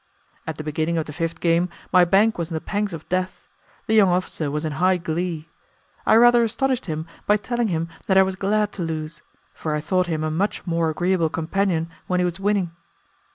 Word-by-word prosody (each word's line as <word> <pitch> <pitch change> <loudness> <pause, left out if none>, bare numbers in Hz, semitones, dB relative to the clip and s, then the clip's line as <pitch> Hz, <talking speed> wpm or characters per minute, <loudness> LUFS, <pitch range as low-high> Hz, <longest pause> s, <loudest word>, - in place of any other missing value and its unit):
At 160 -2 -4
the 155 - -5
beginning 160 +2 -1
of 160 - -1
the 150 - -8
fifth 165 +1 -3
game, 170 +1 +2 0.2
my 180 -1 +7
bank 200 +4 +3
was 170 -1 -2
in 165 - -4
the - - -1
pangs 205 +4 -2
of 165 -2 -8
death; 185 +1 -2 0.4
the 220 - 0
young 210 -4 +6
officer 175 -4 -1
was 150 +2 -2
in 155 - -2
high 185 0 +4
glee. 165 -1 -3 0.6
I - - +6
rather 240 +1 +6
astonished 255 +1 -1
him 155 -1 -3 0.2
by 210 - +5
telling 240 +2 -1
him 165 -3 -1 0.2
that 190 - +3
I 190 - +8
was 190 0 -2
glad 205 +2 0
to 190 - -7
lose, 160 -1 -4 0.3
for 155 -1 -3
I - - 0
thought 180 +3 0
him 160 -2 -2
a 155 - -1
much 190 +7 -1
more 165 -2 +1
agreeable 175 +1 +1
companion 165 +1 0 0.2
when 180 0 +1
he 180 - +2
was 175 +1 -3
winning. 195 -3 0
175 Hz, 215 wpm, -23 LUFS, 160-195 Hz, 0.6 s, I